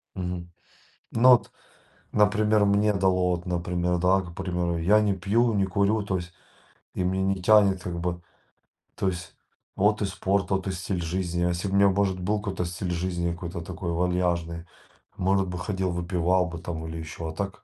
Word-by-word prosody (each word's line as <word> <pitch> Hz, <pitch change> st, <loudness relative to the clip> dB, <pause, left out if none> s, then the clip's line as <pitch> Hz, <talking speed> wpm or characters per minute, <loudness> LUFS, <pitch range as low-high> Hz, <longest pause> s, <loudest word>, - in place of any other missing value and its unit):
Мгм. 90 Hz, -1 st, -4 dB, 0.6 s
Ну 120 Hz, +3 st, +5 dB
вот, 120 Hz, -, +4 dB, 0.6 s
например, 105 Hz, 0 st, +3 dB
мне 105 Hz, +1 st, +3 dB
дало, 95 Hz, -2 st, +2 dB
вот, 85 Hz, -, -9 dB
например, 90 Hz, 0 st, -1 dB
да, 90 Hz, +2 st, +3 dB
например, 90 Hz, -1 st, -3 dB
я 100 Hz, +6 st, +4 dB
не 105 Hz, -2 st, +2 dB
пью, 110 Hz, +6 st, +1 dB
не 100 Hz, -2 st, +2 dB
курю, 100 Hz, +3 st, +1 dB
то 95 Hz, -2 st, -1 dB
есть 90 Hz, 0 st, -7 dB, 0.6 s
и -, -, -1 dB
меня 95 Hz, +1 st, 0 dB
не 95 Hz, -, -9 dB
тянет 100 Hz, -3 st, +5 dB
как 85 Hz, -1 st, -4 dB
бы. 85 Hz, 0 st, -2 dB, 0.8 s
То 95 Hz, -, -1 dB
есть 90 Hz, -2 st, -4 dB, 0.4 s
вот 105 Hz, +2 st, +2 dB
и -, -, +2 dB
спорт, 95 Hz, +1 st, -1 dB
вот 95 Hz, 0 st, 0 dB
и -, -, 0 dB
стиль 90 Hz, 0 st, -3 dB
жизни. 85 Hz, +1 st, -2 dB
Если 90 Hz, +2 st, -1 dB
б 95 Hz, -, -3 dB
у -, -, +2 dB
меня, 100 Hz, 0 st, +6 dB
может, 95 Hz, -1 st, +1 dB
был 105 Hz, +4 st, 0 dB
какой-то 95 Hz, -3 st, -3 dB
стиль 90 Hz, +1 st, -4 dB
жизни, 85 Hz, 0 st, -1 dB
какой-то 85 Hz, 0 st, -6 dB
такой 85 Hz, +1 st, -5 dB
вальяжный, 85 Hz, -1 st, -1 dB, 0.5 s
может 95 Hz, +1 st, +1 dB
бы 90 Hz, 0 st, -4 dB
ходил, 95 Hz, 0 st, -2 dB
выпивал 90 Hz, +1 st, +1 dB
бы 85 Hz, -1 st, -7 dB
там 80 Hz, -1 st, -5 dB
или 80 Hz, 0 st, -6 dB
ещё. 80 Hz, +1 st, -6 dB
А -, -, -6 dB
так 100 Hz, 0 st, -5 dB
90 Hz, 185 wpm, -26 LUFS, 85-100 Hz, 0.8 s, меня